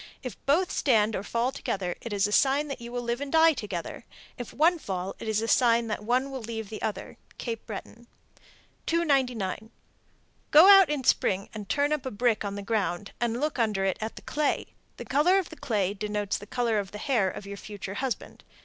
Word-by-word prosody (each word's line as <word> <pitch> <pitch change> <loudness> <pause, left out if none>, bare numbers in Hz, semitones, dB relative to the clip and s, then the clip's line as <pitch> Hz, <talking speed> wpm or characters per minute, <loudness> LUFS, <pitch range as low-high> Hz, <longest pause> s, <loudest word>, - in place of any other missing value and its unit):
If 255 - -5
both 345 +6 +3
stand 220 -5 +2
or - - -2
fall 235 +5 -1
together, 190 -9 -3
it 235 - -6
is 200 -1 +2
a 205 - -2
sign 285 +4 +3
that 270 -3 -6
you 235 0 -8
will 245 0 -3
live 235 +2 -2
and 285 -1 -4
die 325 0 +6
together. 205 - -5 0.3
If 245 - -7
one 335 +4 +3
fall, 190 -5 -4
it - - -7
is 220 0 0
a - - -2
sign 235 -1 +4
that 210 0 -3
one 255 +5 0
will 265 -1 -5
leave 225 -2 -5
the 220 - -7
other. 215 - -4 0.2
Cape 230 -2 -5
Breton. 230 +2 -8 0.8
299. 250 - 0 0.8
Go 315 +5 +8
out 390 -5 +8
in 295 -3 -1
spring 195 -4 +1
and 210 -3 -8
turn 290 +1 +2
up 285 -3 -2
a - - -1
brick 230 0 +1
on 200 -1 -4
the 200 - -5
ground, 200 -3 -1
and 235 0 0
look 300 -2 -1
under 210 -4 +1
it 190 - -1
at 220 +1 -4
the - - -11
clay. 300 -1 -1 0.2
The - - -7
color 310 +7 +3
of 380 -3 -1
the 320 - -10
clay 205 -9 -1
denotes 210 0 -2
the 205 - -11
color 235 -2 0
of 195 -2 -4
the 210 - -8
hair 220 -5 +1
of 195 - -8
your 200 0 -7
future 200 -1 -7
husband. 260 +3 -4
230 Hz, 215 wpm, -27 LUFS, 205-275 Hz, 0.8 s, Go